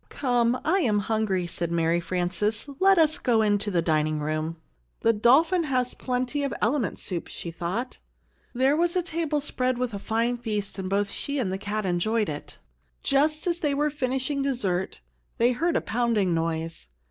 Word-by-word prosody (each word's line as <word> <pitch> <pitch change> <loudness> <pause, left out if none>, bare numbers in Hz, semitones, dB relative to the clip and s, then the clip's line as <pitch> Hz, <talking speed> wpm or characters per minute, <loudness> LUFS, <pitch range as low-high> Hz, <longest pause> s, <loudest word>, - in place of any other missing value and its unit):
"Come, 245 -2 +1
I 360 +6 +3
am 225 - +2
hungry!" 205 -3 0
said 170 0 -3
Mary 165 0 +2
Frances. 185 +7 -1
"Let 390 0 +5
us 315 -2 +3
go 230 -3 +2
into 205 0 +1
the 175 -4 +1
dining 155 -1 +1
room." 155 +2 -2 0.5
"The 230 - +4
dolphin 315 - +4
has 255 -3 0
plenty 255 +2 -2
of 280 - -1
element 230 -1 0
soup," 175 -3 -3
she 170 - -6
thought. 185 +10 -4 0.5
There 260 +3 +2
was 345 +2 +2
the 360 - +2
table 325 -3 -1
spread 255 -3 -1
with 250 -2 -2
a 200 - -4
fine 230 +4 0
feast, 210 -4 -3
and 185 -1 -3
both 200 +1 0
she 285 0 -3
and 205 -8 -1
the 190 - -3
cat 205 +1 -3
enjoyed 205 +4 +1
it. 145 -1 -7 0.5
Just 300 +3 +2
as 345 -1 0
they 290 -4 0
were 295 +1 +1
finishing 270 0 -1
dessert, 200 - -1 0.4
they 240 +2 +4
heard 330 +7 0
a - - +2
pounding 225 -6 +1
noise. 165 - -2
230 Hz, 180 wpm, -26 LUFS, 185-275 Hz, 0.5 s, Let